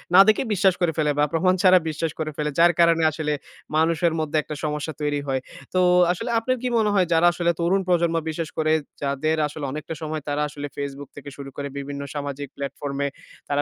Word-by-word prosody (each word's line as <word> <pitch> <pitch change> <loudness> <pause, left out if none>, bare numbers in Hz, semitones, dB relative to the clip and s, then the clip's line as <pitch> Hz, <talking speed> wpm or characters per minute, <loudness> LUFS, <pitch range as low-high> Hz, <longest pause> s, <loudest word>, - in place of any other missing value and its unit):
না - - +10
দেখে 215 - +4
বিশ্বাস 190 -1 +4
করে 175 - +3
ফেলে 150 -2 +2
বা - - +5
প্রমাণ 185 +3 +3
ছাড়া 185 -1 +7
বিশ্বাস 155 +1 -2
করে 155 -1 -2
ফেলে। 150 0 -1
যার 170 +1 +7
কারণে 165 -1 +5
আসলে 150 -1 -2 0.4
মানুষের 165 +1 +2
মধ্যে 155 0 -1
একটা 150 - -6
সমস্যা 150 +1 -2
তৈরি 145 -1 0
হয়। 130 -1 0 0.3
তো 185 - +2 0.3
আসলে 180 - -3
আপনার 255 +3 -1
কি 255 - -1
মনে 215 -2 +3
হয় 190 -3 +4
যারা 165 +1 +5
আসলে 170 -1 +1
তরুণ 185 +3 +2
প্রজন্ম 170 -2 +2
বিশেষ 160 0 -3
করে 155 0 +2 0.3
যাদের 140 +3 0
আসলে 150 -1 -6
অনেকটা 155 +2 -5
সময় 155 -1 -3
তারা 145 +1 -1
আসলে 145 0 -6
Facebook 140 0 -5
থেকে 145 0 -9
শুরু 140 -1 -7
করে 140 - -3
বিভিন্ন 140 0 -5
সামাজিক 145 0 -4
প্লাটফর্ম 140 0 -4
এ - - +1 0.4
তারা 145 0 +1
155 Hz, 205 wpm, -23 LUFS, 145-170 Hz, 0.4 s, না